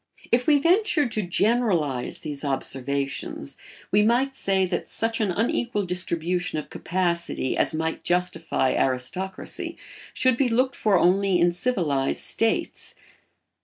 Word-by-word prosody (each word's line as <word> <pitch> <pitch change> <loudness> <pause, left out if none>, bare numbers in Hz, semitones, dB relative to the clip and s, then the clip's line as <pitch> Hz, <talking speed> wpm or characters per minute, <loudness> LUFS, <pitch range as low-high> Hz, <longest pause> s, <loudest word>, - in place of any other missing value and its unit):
If 245 +1 +2
we 300 -2 +6
ventured 335 - +2
to 215 - 0
generalise 180 - +1
these 150 -2 -6
observations 135 - -2 0.4
we 205 - +5
might 250 +5 +2
say 190 -4 +1
that 180 -1 -3
such 225 0 -1
an 210 - +1
unequal 220 +2 0
distribution 180 0 -2
of 150 - -6
capacity 170 -6 -1
as - - +2
might 160 +1 -2
justify 175 -6 0
aristocracy 135 +9 -2 0.3
should 255 -2 +2
be 260 -2 +2
looked 255 +3 +1
for 205 -3 +2
only 185 +1 +3
in 175 0 +4
civilised 170 - 0
states. 225 0 -1
185 Hz, 130 wpm, -25 LUFS, 160-230 Hz, 0.4 s, we